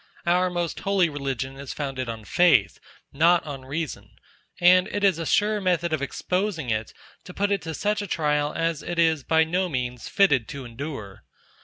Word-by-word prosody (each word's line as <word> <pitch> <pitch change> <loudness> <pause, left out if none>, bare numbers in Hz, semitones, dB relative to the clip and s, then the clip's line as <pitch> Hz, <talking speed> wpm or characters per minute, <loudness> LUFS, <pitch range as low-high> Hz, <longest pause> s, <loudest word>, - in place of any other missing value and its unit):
Our 180 +1 +3
most 175 -2 -3
holy 195 -4 +2
religion 135 -2 -4
is 140 -1 -7
founded 135 -4 -4
on 110 -2 -6
Faith, 175 - +3 0.3
not 170 +4 +4
on 135 -3 -7
reason; 150 +1 -5 0.4
and 180 +2 +6
it 205 -1 -3
is 190 -5 +3
a 165 - -3
sure 210 0 +2
method 175 -3 0
of 155 - 0
exposing 180 - -2
it 110 0 -2 0.3
to 180 - -12
put 205 +1 0
it 200 -2 +1
to 160 -1 -5
such 210 +4 0
a 205 - -5
trial 150 -3 0
as 165 -1 -1
it 175 - -5
is, 160 -4 +2
by 160 +3 +3
no 180 +3 -1
means, 125 -4 -4
fitted 140 - +3
to 140 -2 -7
endure. 115 -5 -7
160 Hz, 185 wpm, -25 LUFS, 135-180 Hz, 0.4 s, and